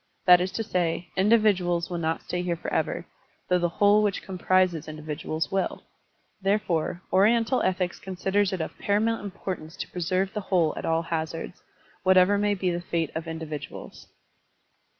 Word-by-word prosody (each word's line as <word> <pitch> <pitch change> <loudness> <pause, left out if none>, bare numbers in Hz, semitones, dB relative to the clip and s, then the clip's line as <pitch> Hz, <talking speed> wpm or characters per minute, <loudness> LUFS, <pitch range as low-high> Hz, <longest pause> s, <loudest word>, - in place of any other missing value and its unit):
That 180 -1 +8
is 185 +1 -1
to 225 - -2
say, 175 -4 -1
individuals 190 -4 +3
will 175 - -2
not 160 0 -1
stay 180 - -3
here 175 -1 -1
forever, 165 - -2 0.4
though 180 0 +3
the 175 0 +1
whole 205 +4 +4
which 205 -2 0
com 185 -2 -7
prises 185 -4 +2
individuals 155 +2 -4
will. 195 -1 -1 0.6
Therefore, 185 -4 0
Oriental 230 +5 +4
ethics 185 -1 -1
considers 190 +1 0
it 185 -3 -2
of 160 - -5
paramotmt 220 +3 +1
importance 185 -5 -6
to - - -6
preserve 185 +2 -1
the 210 - -2
whole 175 -5 +1
at - - -5
all 165 0 +1
hazards, 165 +1 -4 0.4
whatever 190 +2 +5
may 205 0 +2
be 185 -1 0
the 175 0 -2
fate 165 -2 -2
of 160 +1 -4
individuals. 160 -2 -7
180 Hz, 160 wpm, -26 LUFS, 165-195 Hz, 0.6 s, That